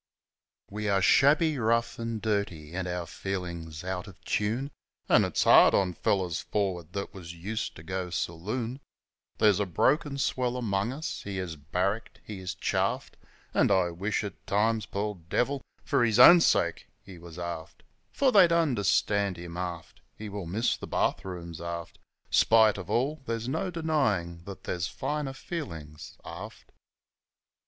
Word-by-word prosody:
We 105 Hz, +1 st, -2 dB
are 100 Hz, -1 st, +3 dB
shabby, 145 Hz, -, +4 dB
rough, 115 Hz, +1 st, +1 dB
'n' 115 Hz, -2 st, -3 dB
dirty, 100 Hz, -8 st, -2 dB
an' 95 Hz, 0 st, -3 dB
our 90 Hz, -1 st, -3 dB
feelin's 85 Hz, -3 st, -5 dB
out 95 Hz, +1 st, -4 dB
of 95 Hz, -, -13 dB
tune, 115 Hz, +7 st, -1 dB, 0.4 s
An' -, -, +5 dB
it's -, -, 0 dB
hard -, -, +7 dB
on 95 Hz, -2 st, +2 dB
fellers 90 Hz, -1 st, 0 dB
f -, -, -19 dB
or'ard 90 Hz, -5 st, -1 dB
that 100 Hz, 0 st, -4 dB
was 85 Hz, -3 st, -9 dB
used 105 Hz, +6 st, -4 dB
to 80 Hz, -, -11 dB
go 95 Hz, +1 st, -3 dB
saloon; 95 Hz, -, -3 dB, 0.6 s
There's 105 Hz, -3 st, +4 dB
a 100 Hz, -, 0 dB
broken 140 Hz, -, +1 dB
swell 125 Hz, -2 st, 0 dB
amongst 105 Hz, -2 st, -1 dB
us 160 Hz, -, -4 dB
he 100 Hz, -1 st, -5 dB
is 90 Hz, -3 st, -4 dB
barracked, 90 Hz, +9 st, -2 dB
he 105 Hz, -3 st, -7 dB
is 95 Hz, 0 st, -5 dB
chaffed, 90 Hz, -, -1 dB, 0.4 s
An' -, -, +3 dB
I 90 Hz, -2 st, +3 dB
wish 100 Hz, +6 st, -2 dB
at 100 Hz, -2 st, -7 dB
times, 110 Hz, +2 st, +1 dB
poor 100 Hz, -1 st, -3 dB
devil, 135 Hz, +7 st, 0 dB, 0.2 s
for -, -, +2 dB
his 110 Hz, -2 st, +2 dB
own 170 Hz, +8 st, +10 dB
sake 85 Hz, -, +2 dB, 0.2 s
he 95 Hz, -3 st, -12 dB
was 85 Hz, -1 st, -11 dB
aft; 85 Hz, -2 st, -6 dB, 0.3 s
For 270 Hz, -2 st, +2 dB
they'd 190 Hz, -6 st, +7 dB
understand 105 Hz, -, +2 dB
him, 85 Hz, 0 st, -8 dB
aft, 85 Hz, -5 st, -6 dB
(He 105 Hz, -1 st, -7 dB
will 100 Hz, -3 st, -6 dB
miss 110 Hz, +8 st, +1 dB
the -, -, -8 dB
bath -, -, 0 dB
rooms 85 Hz, -3 st, -7 dB
aft) 85 Hz, 0 st, -6 dB, 0.3 s
Spite 110 Hz, -3 st, +5 dB
of 95 Hz, 0 st, -8 dB
all 135 Hz, +7 st, 0 dB
there's 115 Hz, 0 st, -2 dB
no 160 Hz, +8 st, -1 dB
denying 135 Hz, -, 0 dB
that 100 Hz, -1 st, -9 dB
there's 90 Hz, +1 st, -2 dB
finer 145 Hz, 0 st, -3 dB
feelin's 80 Hz, -, -7 dB
aft. -, -, -9 dB
100 Hz, 160 wpm, -28 LUFS, 85-115 Hz, 0.6 s, own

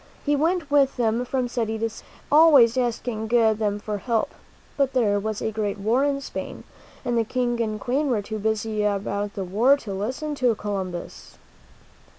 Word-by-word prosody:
He 290 Hz, 0 st, +2 dB
went 320 Hz, 0 st, 0 dB
with 275 Hz, -2 st, +3 dB
them 230 Hz, 0 st, +1 dB
from 255 Hz, 0 st, -1 dB
city 225 Hz, -2 st, -2 dB
to 225 Hz, +1 st, 0 dB
city, 220 Hz, -, -12 dB, 0.2 s
always 290 Hz, -7 st, +7 dB
asking 240 Hz, -3 st, -2 dB
them 220 Hz, -3 st, +2 dB
for 210 Hz, 0 st, -4 dB
help. 230 Hz, 0 st, -1 dB, 0.4 s
But 275 Hz, -2 st, +1 dB
there 210 Hz, -6 st, +2 dB
was 215 Hz, 0 st, -3 dB
a 220 Hz, -, -1 dB
great 210 Hz, -2 st, -2 dB
war 225 Hz, +7 st, +1 dB
in 280 Hz, -1 st, 0 dB
Spain, -, -, -7 dB, 0.4 s
and 240 Hz, -1 st, +1 dB
the -, -, +2 dB
King 240 Hz, +1 st, -1 dB
and 215 Hz, -1 st, -2 dB
Queen 275 Hz, +6 st, 0 dB
were 220 Hz, -5 st, 0 dB
too 215 Hz, +1 st, -5 dB
busy 220 Hz, 0 st, -1 dB
about 205 Hz, 0 st, -2 dB
the 195 Hz, -, -3 dB
war 230 Hz, +10 st, +4 dB
to 210 Hz, -8 st, -7 dB
listen 255 Hz, +10 st, -3 dB
to 250 Hz, -5 st, +1 dB
Columbus. 190 Hz, -4 st, -6 dB
225 Hz, 175 wpm, -24 LUFS, 210-260 Hz, 0.4 s, always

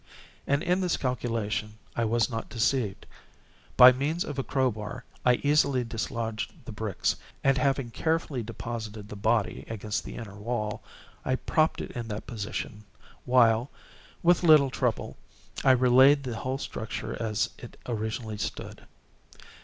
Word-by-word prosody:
And 140 Hz, +1 st, +2 dB
in 180 Hz, +2 st, +1 dB
this 180 Hz, -2 st, +1 dB
calculation 115 Hz, -4 st, -2 dB, 0.2 s
I 115 Hz, -, +1 dB
was 115 Hz, +1 st, +2 dB
not 115 Hz, -3 st, -5 dB
deceived. 115 Hz, -4 st, 0 dB, 0.7 s
By 125 Hz, +1 st, +11 dB
means 145 Hz, +7 st, -1 dB
of 145 Hz, -2 st, -5 dB
a -, -, 0 dB
crow 130 Hz, -2 st, +1 dB
bar 105 Hz, +3 st, -7 dB, 0.2 s
I 125 Hz, 0 st, +5 dB
easily 140 Hz, -3 st, +3 dB
dislodged 115 Hz, -1 st, -4 dB
the -, -, -6 dB
bricks, 105 Hz, -2 st, -1 dB, 0.3 s
and, 135 Hz, 0 st, +4 dB
having 135 Hz, -3 st, 0 dB
carefully 160 Hz, -1 st, -1 dB
deposited 110 Hz, -2 st, -6 dB
the -, -, -7 dB
body 105 Hz, -2 st, 0 dB
against 110 Hz, -1 st, -3 dB
the -, -, -8 dB
inner 110 Hz, -4 st, -7 dB
wall, 105 Hz, -1 st, -3 dB, 0.4 s
I 130 Hz, -, +1 dB
propped 155 Hz, +4 st, +1 dB
it -, -, -6 dB
in 120 Hz, -3 st, -5 dB
that 105 Hz, -1 st, -5 dB
position, 105 Hz, -1 st, -5 dB, 0.4 s
while, 120 Hz, 0 st, +4 dB, 0.5 s
with 175 Hz, 0 st, +5 dB
little 155 Hz, -6 st, +6 dB
trouble, 125 Hz, -3 st, -1 dB, 0.5 s
I -, -, +4 dB
re 130 Hz, -1 st, +5 dB
laid 135 Hz, +3 st, +6 dB
the 125 Hz, -3 st, -4 dB
whole 130 Hz, +4 st, -2 dB
structure 110 Hz, -5 st, -5 dB
as 110 Hz, -2 st, 0 dB
it -, -, -11 dB
originally 110 Hz, -1 st, -3 dB
stood. -, -, -5 dB
120 Hz, 150 wpm, -28 LUFS, 110-135 Hz, 0.7 s, By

